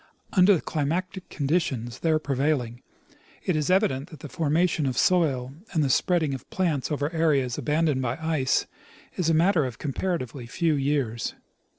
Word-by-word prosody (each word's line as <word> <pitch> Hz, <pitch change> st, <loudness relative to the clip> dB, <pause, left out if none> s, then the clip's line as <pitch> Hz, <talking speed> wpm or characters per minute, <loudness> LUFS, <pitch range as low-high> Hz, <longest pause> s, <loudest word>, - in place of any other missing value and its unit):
Under 190 Hz, 0 st, +6 dB
the 165 Hz, -, -2 dB
climatic 180 Hz, +5 st, -2 dB
conditions 135 Hz, -6 st, -1 dB
there 160 Hz, -2 st, +2 dB
prevailing, 135 Hz, -4 st, -1 dB, 0.6 s
it 180 Hz, -, 0 dB
is 150 Hz, +1 st, 0 dB
evident 170 Hz, -6 st, +2 dB
that 155 Hz, -4 st, -12 dB
the 150 Hz, -, -8 dB
formation 160 Hz, 0 st, +1 dB
of 130 Hz, -, -2 dB
soil 135 Hz, -8 st, +2 dB, 0.2 s
and 160 Hz, -4 st, +2 dB
the 135 Hz, -, +1 dB
spreading 160 Hz, -1 st, +2 dB
of 135 Hz, -, -8 dB
plants 165 Hz, -7 st, -1 dB
over 145 Hz, +2 st, -1 dB
areas 145 Hz, -7 st, +1 dB
abandoned 150 Hz, -3 st, +1 dB
by 125 Hz, 0 st, -2 dB
ice 160 Hz, -5 st, +1 dB, 0.5 s
is 175 Hz, -3 st, 0 dB
a 165 Hz, -, +3 dB
matter 170 Hz, 0 st, +3 dB
of 125 Hz, -3 st, -4 dB
comparatively 140 Hz, -5 st, -3 dB
few 165 Hz, +6 st, 0 dB
years. 135 Hz, -5 st, -1 dB
150 Hz, 160 wpm, -26 LUFS, 130-165 Hz, 0.6 s, Under